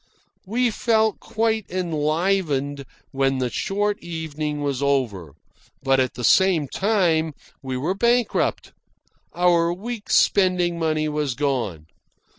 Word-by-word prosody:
We 240 +3 +1
felt 220 -1 +1
quite 220 -1 -1
enlivened 155 -4 -1 0.3
when 135 -1 +1
the 125 -2 -1
short 205 - -1
evening 155 -3 -4
was 140 -2 -2
over; 120 - -1 0.5
but 135 -1 +3
at 130 -1 0
the 125 - -6
same 175 - +4
time 170 -5 +1 0.3
we 130 -2 -4
were 155 +8 -1
bankrupt. 235 +4 +1 0.6
Our 175 -1 +3
week's 215 +4 -3
spending 180 -3 +2
money 155 -1 0
was 150 -4 -2
gone. 120 - -2
160 Hz, 115 wpm, -23 LUFS, 140-195 Hz, 0.6 s, same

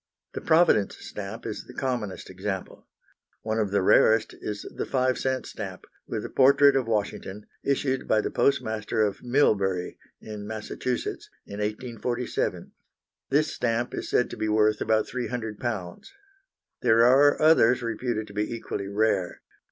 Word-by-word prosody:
The - - -5
Providence 160 - +3
stamp 105 +3 -8
is 110 - -5
the - - -13
commonest 120 -7 -3
example. 95 0 -5 0.6
One 110 0 -1
of 105 -2 0
the 100 -1 +1
rarest 110 +3 +4
is 105 -1 -5
the - - -3
5 130 -1 +1
c. 130 -1 -1
stamp, - - -7 0.2
with - - -4
a - - -5
portrait 140 +1 +5
of 130 -3 +1
Washington, 105 -2 -3 0.2
issued 135 -1 0
by 110 - +3
the - - -3
postmaster 110 -5 +1
of 105 -2 -2
Millbury, 100 -9 +1 0.2
in 105 -1 -8
Massachusetts, 110 +3 -4 0.2
in 100 - -8
1847. 120 +3 -3 0.6
This 150 +3 +2
stamp 120 0 -1
is - - -4
said 125 - +1
to - - -7
be 110 - -1
worth 105 0 +2
about 110 0 +2
£300. 115 -6 -4 0.7
There 115 +1 +5
are 140 +4 +5
others 130 -6 +5
reputed 115 -1 -2
to 100 - -13
be 105 +1 -2
equally 110 -4 -4
rare. 100 -3 0
110 Hz, 145 wpm, -26 LUFS, 105-125 Hz, 0.7 s, portrait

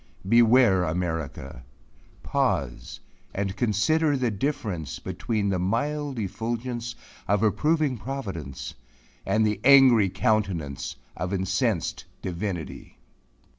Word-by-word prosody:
Beware 115 -3 +5
America! 80 -6 -3 0.6
pause - - -1 0.3
and 95 -1 -2
consider 140 +8 +2
the 125 -3 0
difference 105 - -3
between 105 -3 -2
the 95 -2 0
mild 140 +8 -1
effulgence 115 +3 -3 0.3
of 100 +2 +2
approving 140 - +1
providence 85 - -5 0.5
and 110 0 +3
the 105 -2 0
angry 130 -6 +7
countenance 85 - -1 0.2
of 90 +1 -3
incensed 95 - -1 0.2
divinity! 90 -4 -5
105 Hz, 95 wpm, -26 LUFS, 90-125 Hz, 0.6 s, angry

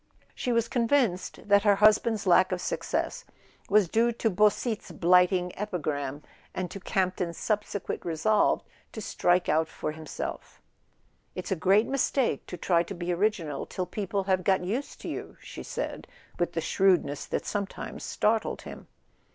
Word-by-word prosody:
She 250 - -2
was 230 -1 +2
convinced 230 -8 0
that 200 0 +5
her 205 -1 +4
husband's 215 +1 +4
lack 185 +1 +5
of 185 - 0
suc¬ - - -3
cess - - -2 0.5
was 205 -2 +5
due 230 +6 +2
to 230 -1 0
Beausite's 210 +3 +1
blighting 180 +1 +3
epigram, 150 -8 -3 0.3
and 185 -1 -3
to 195 - -6
Campton's 185 -3 -1
subsequent 210 -2 -2
resolve 175 +6 +2 0.3
to - - -6
strike 175 -3 +1
out 160 +1 +2
for 155 - -4
him¬ 155 0 -10
self. - - -6 0.4
" - - -41
It's 185 - -5
a - - +3
great 195 +6 +4
mistake 270 - 0
to 180 - -6
try 170 0 +2
to 185 +3 -5
be 175 0 -2
original 170 -7 -1
till 185 - -3
people 195 +1 -2
have 185 -1 +1
got 190 0 +2
used 230 +10 -4
to - - -7
you," - - -6
she - - -9
said, - - -5 0.3
with 175 0 0
the 165 - -1
shrewdness 175 -5 +2
that - - -2
sometimes 200 -2 -4
startled 220 +1 0
him. - - -10
190 Hz, 165 wpm, -28 LUFS, 175-215 Hz, 0.5 s, that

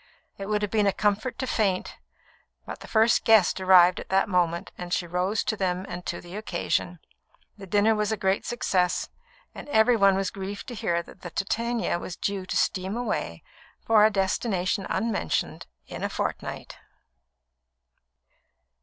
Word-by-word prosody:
It 195 - -5
would 210 0 0
have 205 - -2
been 210 -2 +2
a - - +4
comfort 210 +6 0
to 260 - -2
faint, 200 -7 -1 0.7
but - - -7
the - - -11
first 225 +1 +3
guest 215 -4 +4
arrived 185 -1 +6
at - - -9
that 190 0 +2
moment, 175 -3 0
and 175 0 -8
she 175 - 0
rose 180 +5 -1
to - - -1
them 185 -2 -1
and 180 -1 -6
to - - -3
the 175 +2 -11
occasion. 190 -4 -2 0.6
The 195 -2 -11
dinner 205 +3 +3
was 210 0 -1
a 220 - -1
great 190 0 0
success, 185 -6 0 0.4
and - - -10
every 235 -1 +4
one 195 -3 +4
was 195 -1 -1
grieved 200 +1 -6
to - - -6
hear 170 -6 -1
that - - -16
the 175 - -7
Titania 230 +1 -1
was 175 - -6
due 195 -2 -3
to - - -1
steam 190 +4 0
away 215 - -3 0.4
for 220 -2 +5
a 215 - +6
destination 195 -1 -1
unmentioned 200 - -2 0.2
in - - -8
a - - 0
fortnight. - - -4
195 Hz, 170 wpm, -26 LUFS, 185-215 Hz, 0.7 s, arrived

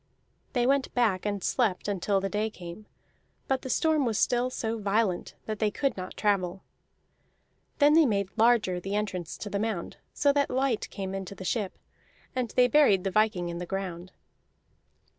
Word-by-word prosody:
They 245 -2 +2
went 275 +1 +2
back 210 -6 +2
and 200 -3 -2
slept 215 -8 0
until 200 0 +1
the 195 - -2
day 210 +2 -1
came, 185 +1 -10 0.6
but 265 -1 0
the 260 - -6
storm 310 +2 +2
was 225 -4 0
still 245 +1 +2
so 230 -2 -3
violent 205 -2 0
that 215 -1 -4
they 215 - +2
could 270 +3 -1
not 185 -1 -7
travel. 190 -3 0 1.1
Then 290 0 +5
they 320 -2 +6
made 200 -4 0
larger 225 -5 +3
the 195 +3 -4
entrance 190 -5 -3
to - - -6
the 200 - -1
mound 210 -5 -3
so 285 -1 +2
that 285 0 +1
light 260 -3 0
came 190 -1 -5
into 195 0 -5
the 190 - -8
ship; 205 -1 -2 0.6
and 250 -2 -1
they 250 0 +6
buried 225 -8 +4
the 195 - -1
viking 215 -4 +1
in 170 0 -5
the 180 - -5
ground. 185 -2 -5
210 Hz, 180 wpm, -28 LUFS, 190-245 Hz, 1.1 s, they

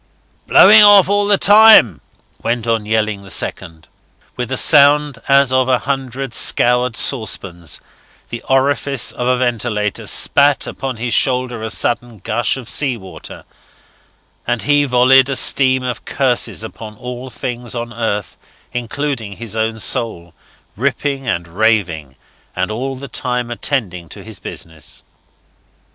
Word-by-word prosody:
"Blowing 210 +2 +7
off 205 -3 +7
all 205 0 +1
the 205 -1 +3
time," 205 - +6 0.4
went 115 0 -2
on 115 -2 -1
yelling 110 -2 -1
the 100 - -14
second. 80 -2 -3 0.5
With 125 0 -5
a 130 - -1
sound 145 -2 +4
as 140 -1 +3
of 130 0 +1
a 130 - +3
hundred 135 -1 -5
scoured 125 -1 +2
saucepans, 90 - -2 0.5
the 120 - -6
orifice 135 -1 +1
of 125 - -4
a 125 0 +1
ventilator 115 -4 -2
spat 145 0 +3
upon 130 -3 -6
his 120 +1 -3
shoulder 125 -3 0
a 110 - -4
sudden 120 0 -2
gush 110 +7 -1
of 125 -4 -10
salt 130 -1 -1
water, 95 -4 -11 1.0
and 120 -1 -1
he 145 0 +2
volleyed 130 +1 +4
a 135 - -2
stream 130 -1 +2
of 125 -1 -5
curses 125 -4 -1
upon 110 -1 -10
all 125 +2 -8
things 120 0 -6
on 120 0 -6
earth 110 -3 -4 0.4
including 125 -2 -4
his 110 +1 -8
own 110 0 -2
soul, 110 -9 -3 0.4
ripping 135 +2 -3
and 85 -5 -2
raving, 85 - -1 0.4
and 95 +3 -2
all 130 +5 -4
the 140 +2 -9
time 125 -2 -2
attending 100 - -3
to - - -11
his - - -9
business. 80 -2 -7
120 Hz, 140 wpm, -16 LUFS, 110-135 Hz, 1.0 s, Blowing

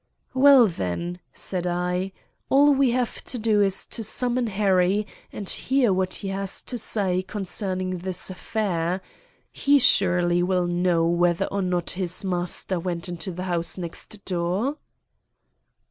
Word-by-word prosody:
"Well, 265 -1 +7
then," 170 - -3
said 180 -2 -4
I, 180 +2 -1 0.4
"all 285 +2 +6
we 270 -1 +3
have 245 0 -1
to 250 - -5
do 215 -2 +2
is 195 -1 +1
to 225 - -6
summon 245 +3 0
Harry 195 -1 +2 0.3
and 200 - -7
hear 255 -3 +2
what 185 0 0
he 195 - -4
has 195 0 -3
to 245 - -5
say 195 -4 0
concerning 185 -2 -3
this 185 +1 -4
affair. 185 -2 -2 0.5
He 285 0 +3
surely 180 -7 +3
will 180 0 +1
know 175 -1 +1
whether 175 0 +2
or 200 - -2
not 180 -2 -1
his 185 +1 -3
master 180 0 -1
went 175 0 -3
into 175 +1 -4
the 180 +1 -5
house 175 -1 -2
next 185 +4 -5
door." 185 - -1
185 Hz, 145 wpm, -24 LUFS, 175-210 Hz, 0.5 s, Well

